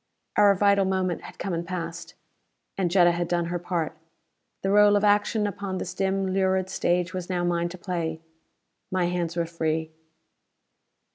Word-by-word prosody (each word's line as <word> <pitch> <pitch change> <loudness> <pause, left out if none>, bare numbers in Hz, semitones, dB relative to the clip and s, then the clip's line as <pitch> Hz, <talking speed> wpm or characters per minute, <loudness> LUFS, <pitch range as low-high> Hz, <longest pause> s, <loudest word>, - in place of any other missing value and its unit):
Our 205 -1 +6
vital 200 0 +3
moment 185 -2 -1
had - - -11
come 195 - -3
and 170 0 -2
passed. 170 -1 -6 0.6
And 185 -3 0
Jetta 175 -1 +5
had 175 0 -2
done 175 0 0
her 175 - -1
part; 175 -2 -2 0.7
the 195 - +1
role 205 0 +6
of 205 - +2
action 210 +1 +3
upon 200 -1 -3
this 180 -1 -4
dim 190 0 0
lurid 190 -1 +1
stage 180 0 0
was 185 -1 -5
now 180 -1 -1
mine 175 0 0
to 180 - -9
play. 170 -3 -3 0.7
My 185 -1 +1
hands 175 -1 -2
were 170 -1 0
free. 160 -1 -2
180 Hz, 165 wpm, -26 LUFS, 170-195 Hz, 0.7 s, Our